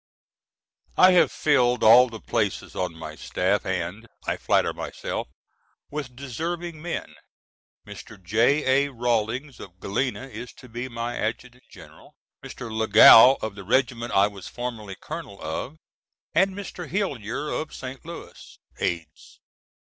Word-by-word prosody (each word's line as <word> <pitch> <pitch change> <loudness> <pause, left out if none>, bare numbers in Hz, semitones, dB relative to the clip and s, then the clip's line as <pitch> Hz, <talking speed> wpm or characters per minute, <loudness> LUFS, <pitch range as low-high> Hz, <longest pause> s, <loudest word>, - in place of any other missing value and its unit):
I 185 0 +8
have 180 - +4
filled 125 -5 +2
all 125 +3 +8
the 115 -1 -8
places - - -2
on 90 -3 -2
my 80 -1 -8
staff 95 +6 -1
and, 95 +4 -3 0.2
I - - 0
flatter - - +1
myself, - - -5 0.6
with 140 -4 -5
deserving 160 +5 -5
men: 175 +1 -5 0.7
Mr. - - -11
J.A. 130 - +2
Rawlins 120 +2 -1
of 95 -1 -12
Galena 125 +7 -2
is 120 -1 -9
to 130 - -15
be 120 +2 -6
my 115 0 -4
Adjutant 125 +3 -4
General, - - -16 0.3
Mr. 115 -2 -8
Lagow 110 +3 +8
of 110 -2 -3
the 100 -1 -10
regiment 120 +1 0
I 100 +1 +5
was 100 -2 -7
formerly 115 -5 -6
colonel 155 -11 -8
of, 80 - -5 0.6
and 190 +3 +3
Mr. 185 -5 -7
Hillyer 145 - -2
of 155 - -3
St. 130 +1 -8
Louis, 170 +1 -11 0.2
aides. 80 -3 -4
120 Hz, 135 wpm, -25 LUFS, 105-140 Hz, 0.7 s, I